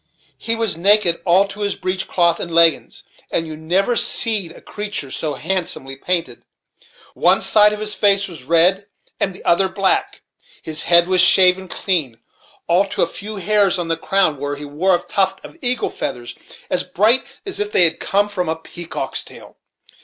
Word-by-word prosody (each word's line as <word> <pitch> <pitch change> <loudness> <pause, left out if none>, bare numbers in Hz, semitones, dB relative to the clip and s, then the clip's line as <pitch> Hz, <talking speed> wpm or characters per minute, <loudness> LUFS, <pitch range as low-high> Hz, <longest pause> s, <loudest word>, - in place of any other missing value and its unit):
He 230 - +1
was 225 -5 -1
naked 190 -1 +3
all 185 +3 +3
to 200 +1 -11
his 205 -1 -2
breech 185 +1 -4
cloth 170 -2 +1
and 170 - -5
leggins; 165 -3 +2 0.3
and 165 - -2
you 155 -1 -8
never 180 +9 0
seed 215 -7 +2
a - - -14
creatur' 205 -10 -5
so 150 0 -3
handsomely 165 -6 -3
painted. 175 +5 -2 0.7
One - - +2
side 210 0 +4
of 210 - -5
his 210 0 0
face 200 0 +2
was 170 -6 -10
red 170 +7 +2 0.3
and 195 - 0
the 185 - -14
other 190 +2 +2
black. 195 0 -1 0.4
His 155 -1 -3
head 170 0 +4
was 185 -1 +4
shaved 185 0 +6
clean, 155 - -2 0.5
all 180 +4 +2
to - - -1
a - - 0
few 210 +2 -7
hairs 200 -1 +1
on 175 -2 -4
the 165 - +1
crown, 185 -2 0
where 145 +1 -4
he 145 +1 -9
wore 170 +6 +1
a - - -2
tuft 190 -1 -1
of - - -13
eagle's 250 -2 -1
feathers, 120 0 -4 0.4
as - - +1
bright 225 +7 +1 0.2
as 390 - -4
if 210 0 -3
they 180 - +4
had 165 -1 +1
come 205 +1 0
from 185 -5 -4
a 160 - -1
peacock's 170 +1 -6
tail. - - -14
185 Hz, 185 wpm, -18 LUFS, 165-200 Hz, 0.7 s, shaved